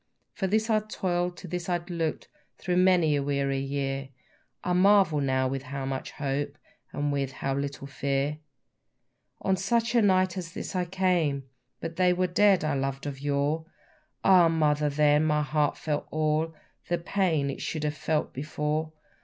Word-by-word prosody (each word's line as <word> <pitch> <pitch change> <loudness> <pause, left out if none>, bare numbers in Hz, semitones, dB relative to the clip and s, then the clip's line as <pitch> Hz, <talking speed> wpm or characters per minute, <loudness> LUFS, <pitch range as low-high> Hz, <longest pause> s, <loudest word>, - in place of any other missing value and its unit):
For 190 - -2
this 215 +3 +1
I 220 -2 +3
toil'd, 180 -4 -2
to 185 - -9
this 180 +1 -4
I 175 - +2
look'd 170 -2 -3 0.3
through 180 -1 -1
many 180 -5 +4
a 140 - +1
weary 140 -1 0
year, 135 0 -3 0.5
I 180 - 0
marvel 185 -4 +4
now 130 -1 +1
with 135 0 -2
how 135 0 -5
much 135 0 -4
hope, 145 0 -2 0.3
and 145 0 -1
with 135 -2 -1
how 135 0 -2
little 140 0 -3
fear. 140 +2 -1 1.0
On 190 - +2
such 225 +5 0
a 235 - +5
night 185 -2 +3
at 170 0 -8
last - - -5
I 180 -1 +1
came, 175 -6 +1 0.4
But 165 0 -5
they 180 -1 +4
were 185 +1 +1
dead 190 0 +4
I 155 -1 0
loved 135 0 -2
of 140 -2 -5
yore. 145 +3 0 0.6
Ah, 185 -3 +7
Mother, 150 -2 +2
then 150 +1 +3
my 150 -1 +2
heart 150 0 0
felt 150 -2 -2
all 155 +1 0 0.3
The 175 - +1
pain 165 -5 0
it - - -7
should 155 -2 -3
have 150 -1 0
felt 150 +1 -1
before! 150 +2 -2
155 Hz, 170 wpm, -27 LUFS, 140-180 Hz, 1.0 s, Ah